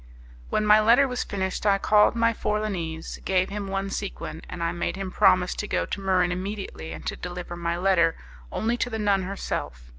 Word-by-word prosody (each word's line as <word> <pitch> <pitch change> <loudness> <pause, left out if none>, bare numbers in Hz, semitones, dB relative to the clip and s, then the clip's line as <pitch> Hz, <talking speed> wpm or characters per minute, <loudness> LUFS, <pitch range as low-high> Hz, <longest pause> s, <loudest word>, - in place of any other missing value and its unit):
When 215 - +1
my 210 0 +7
letter 235 +6 +5
was 250 -1 -2
finished, 190 -2 -3
I 200 -1 +4
called 210 +3 +4
my 230 0 +3
Forlanese, 190 -8 -3
gave 185 -1 +1
him 205 -1 -4
one 195 0 -2
sequin, 190 -6 -5
and 175 -1 -5
I 165 - +1
made 175 - -2
him 195 -1 -5
promise 180 0 +4
me - - -15
to 210 - -3
go - - 0
to 200 - -5
Muran 185 -2 +2
immediately, 185 - -5
and 80 -2 -8
to 65 - -2
deliver 175 0 -6
my 170 0 -2
letter 175 -3 +3 0.4
only 230 +2 0
to 245 - -1
the 225 - -3
nun 205 -2 +2
herself. 65 - -5
195 Hz, 205 wpm, -25 LUFS, 175-210 Hz, 0.4 s, my